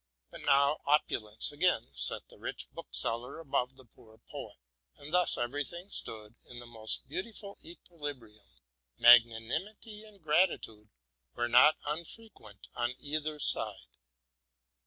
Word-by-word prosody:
But - - -9
now 140 +2 +3
opulence 110 -6 +1
again 145 - +1
set 65 0 0
the - - -18
rich - - -5
bookseller 115 - -2
above 135 -5 -2
the 130 -1 -16
poor 110 -1 -20
poet, - - -10 0.4
and 145 +2 -9
thus 180 0 +3
every 130 +5 -1
thing 175 +6 -9
stood 110 -1 -4
in 125 - -10
the 120 - -8
most 110 -2 -3
beautiful 200 - -6
equilibrium. 145 - -9 0.5
Magnanimity 120 - +3
and 210 -2 -16
gratitude 150 - 0 0.5
were 120 - -1
not 125 +6 +6
unfre 170 +9 -5
quent 100 -1 -15
on 120 +1 -2
either 150 +1 -2
side. - - +2
140 Hz, 130 wpm, -31 LUFS, 115-165 Hz, 0.5 s, not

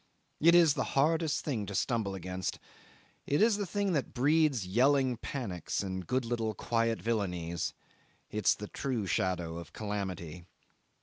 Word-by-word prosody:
It 170 +2 +6
is 165 -4 +7
the - - -1
hardest 160 +1 +2
thing 115 -9 -2
to 100 - -5
stumble 110 -3 0
against; 95 0 -4 0.7
it 145 - +2
is 220 -1 +4
the 205 -2 -2
thing 200 +1 0
that 145 -4 -2
breeds 145 -4 +3
yelling 130 +6 +3
panics 100 - -3
and 95 -2 -4
good 130 0 0
little 115 -2 -1
quiet 115 -1 0
villainies; 90 -7 -2 0.6
it's 105 -2 +2
the 105 - -7
true 125 -4 -2
shadow 85 -2 -1
of 85 - -11
calamity. 95 -5 -4
115 Hz, 145 wpm, -31 LUFS, 95-140 Hz, 0.7 s, is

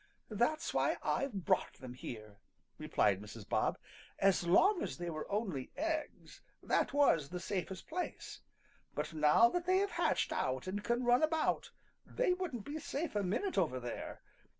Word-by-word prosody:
"That's 305 +10 0
why - - +2
I've 210 - -1
brought - - +2
them 130 -2 -9
here," 110 -5 -8 0.4
replied 100 -2 +2
Mrs. 105 0 -10
Bob. - - +1 0.4
"As 190 -3 +3
long 365 - +5
as - - -3
they 175 0 -4
were 155 +3 -6
only 195 - -2
eggs 315 0 -3 0.2
that - - +1
was 220 - +3
the 180 - -4
safest 185 0 -4
place, 355 +2 -5 0.5
but - - -3
now 150 +8 +6
that 350 +5 -2
they 370 0 +4
have 400 +1 +1
hatched - - +1
out 130 +5 -1
and 200 +3 -3
can 240 +3 0
run 245 +1 +4
about, 315 0 +1 0.3
they - - +1
wouldn't 320 - -4
be 300 +2 -4
safe 295 -1 -4
a 205 - +2
minute 205 - 0
over 150 -8 0
there. 120 -1 -6
205 Hz, 165 wpm, -35 LUFS, -, 0.5 s, now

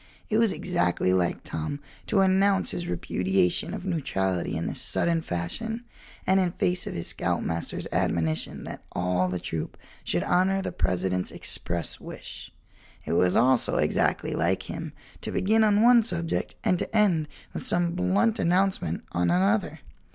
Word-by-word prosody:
It 215 - +3
was 230 -3 +4
exactly 90 - 0
like 90 -2 0
Tom 80 - -4 0.3
to 200 - +3
announce 190 +1 +3
his 175 - -4
repudiation 90 +1 0
of - - -6
neutrality 95 - -1
in 85 - -3
this - - -3
sudden 170 -1 +1
fashion 190 - -4 0.4
and 190 +1 +4
in 180 -2 +1
face 180 0 0
of - - -4
his 85 - -3
scoutmaster's 85 0 -2
admonition 80 -2 -1
that - - -8
all 90 +1 +1
the 90 0 -2
troop 80 -2 -5 0.3
should - - 0
honor 185 +2 +2
the 195 - -3
President's 90 0 0
express 85 -1 -3
wish. - - -9 0.5
It - - -2
was 90 +1 +3
also 130 0 +4
exactly - - +1
like - - 0
him - - -6 0.3
to - - -3
begin 220 +3 +3
on 210 0 +4
one 240 0 +7
subject 170 -7 -2
and 180 - +2
to 225 - -2
end 175 -8 +3 0.3
with - - -5
some 175 -1 +2
blunt 190 +5 +1
announcement 180 - +1
on 90 0 +1
another. 95 +4 +1
160 Hz, 155 wpm, -26 LUFS, -, 0.5 s, one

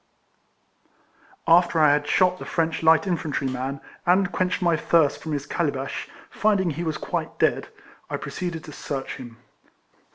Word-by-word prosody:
After 170 0 +5
I 150 -2 +6
had 145 0 0
shot 185 +2 +3
the - - -7
French 165 -1 -1
light 160 +2 +5
infantry 160 -6 -2
man, 130 +2 -3 0.2
and 185 +2 +3
quenched 185 -1 0
my 175 -2 +2
thirst 155 -2 +2
from 160 - -5
his 145 -1 -2
cali 170 -4 0
bash, 135 -1 -5 0.2
finding 200 -5 +2
he 165 +4 -4
was 160 -2 -2
quite - - -4
dead, - - +1 0.4
I - - -2
proceeded 175 -2 -5
to 155 - -10
search 140 -2 -5
him. 120 -2 -10
160 Hz, 160 wpm, -24 LUFS, 145-180 Hz, 0.4 s, I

